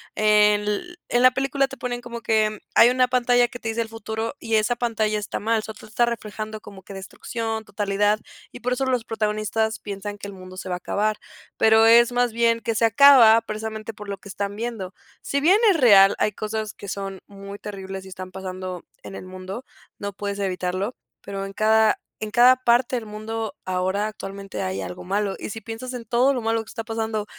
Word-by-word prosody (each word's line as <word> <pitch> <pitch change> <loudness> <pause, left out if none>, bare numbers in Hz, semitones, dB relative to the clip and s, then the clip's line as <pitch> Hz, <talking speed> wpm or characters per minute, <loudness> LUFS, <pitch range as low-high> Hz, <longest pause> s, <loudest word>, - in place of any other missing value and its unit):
En 210 -1 +4
l 210 +13 -3
en 245 - +2
la 255 - +8
película, 270 +1 0
te 270 -1 -10
ponen 245 0 -4
como 235 -1 -7
que 215 -1 +1
hay 235 - +7
una 255 0 +3
pantalla 245 -1 +3
que 245 0 -10
te 225 - -4
dice 230 +1 -1
el 225 - -4
futuro, 225 +1 -4
y 225 -2 -1
esa 215 +3 +2
pantalla 220 -3 0
está 210 - -4
mal. 225 0 +1
Solo 220 0 -9
te - - -12
está 230 +3 +1
reflejando 215 -1 -5
como 200 -2 -12
que 195 - -11
destrucción, 220 +3 -5
totalidad, 205 +1 0 0.3
y - - -11
por 250 +1 0
eso 265 +2 -1
los 250 -3 0
protagonistas, 220 0 -1
piensan 205 0 -6
que 205 - -9
el 200 - -8
mundo 185 0 -11
se 185 - -7
va 180 - -1
a - - -4
acabar. 210 +4 -1 0.4
Pero, 220 0 +5
es 235 +1 +6
más 245 -1 +1
bien 230 0 +2
que 230 - -1
se 230 +1 +2
acaba, 230 -2 +8
precisamente 220 0 -6
por 210 0 -10
lo 200 - -4
que 200 - -14
están 200 +1 -4
viendo. 220 -5 -5 0.3
Si 280 0 -1
bien 370 +7 +5
es 375 - +3
real, 200 -5 +7
hay 210 - +1
cosas 215 0 -4
que 200 - -11
son 195 0 -5
muy 200 0 -10
terribles, 195 -2 -7
y - - -11
están 185 0 -8
pasando 185 0 -7 0.4
en 195 - -9
el - - -8
mundo, 185 +6 -8 0.3
no 200 0 -4
puedes 200 0 -4
evitarlo, 185 +3 -2 0.3
pero, 195 -1 -5
en 195 - -7
cada 220 +1 +3 0.2
en 215 -1 -4
cada 250 +1 +7
parte 245 0 +2
del 235 -3 -3
mundo, 215 +1 -5
ahora 185 +3 0
actualmente 195 -2 -7
hay 95 +1 -2
algo 90 -1 -7
malo. 200 +1 -1
Y - - -6
si 225 - -6
piensas 225 +4 -7
en 235 -2 -6
todo 250 +4 +3
lo 255 - -1
malo, 225 0 0
que 220 - -16
está 225 - -6
pasando 220 -2 -2
215 Hz, 215 wpm, -23 LUFS, 200-235 Hz, 0.4 s, la